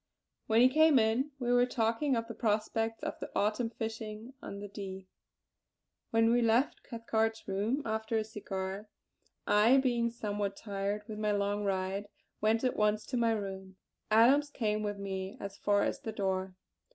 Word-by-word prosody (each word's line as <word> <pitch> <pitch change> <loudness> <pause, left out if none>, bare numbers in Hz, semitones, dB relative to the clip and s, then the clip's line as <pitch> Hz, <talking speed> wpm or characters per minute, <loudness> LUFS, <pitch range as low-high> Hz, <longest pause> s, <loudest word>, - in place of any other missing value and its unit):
When 225 +1 +4
he 250 - +8
came 310 +2 +5
in 230 +5 +2
we 245 -2 0
were 245 0 +4
talking 240 +4 +1
of 230 0 -2
the - - -6
prospects 225 0 -1
of - - -4
the - - -6
Autumn 215 +3 +1
fishing 220 +1 -6
on 200 - -7
the 205 - -6
Dee. 190 -2 -7 1.0
When 225 0 +3
we 240 +1 +4
left 235 +4 +2
Cathcart's 225 -1 -2
room, 210 +9 -1
after 220 0 -1
a 220 - +1
cigar, 195 -1 -5 0.6
I, 215 +5 +5
being 240 -3 +2
somewhat 205 -3 -3
tired 200 0 -3
with 215 -2 -6
my 210 -1 +1
long 205 0 0
ride, 195 +1 -1 0.3
went 220 +2 +2
at 255 - +1
once 210 0 +1
to 260 - -4
my 230 -1 +3
room. 190 -2 -5 0.3
Adams 255 +7 +5
came 215 -6 -1
with 205 -1 -2
me 195 +2 -5
as 200 0 -7
far 205 0 +2
as - - -1
the 220 - -5
door. 190 -2 -2
220 Hz, 170 wpm, -32 LUFS, 200-230 Hz, 1.0 s, he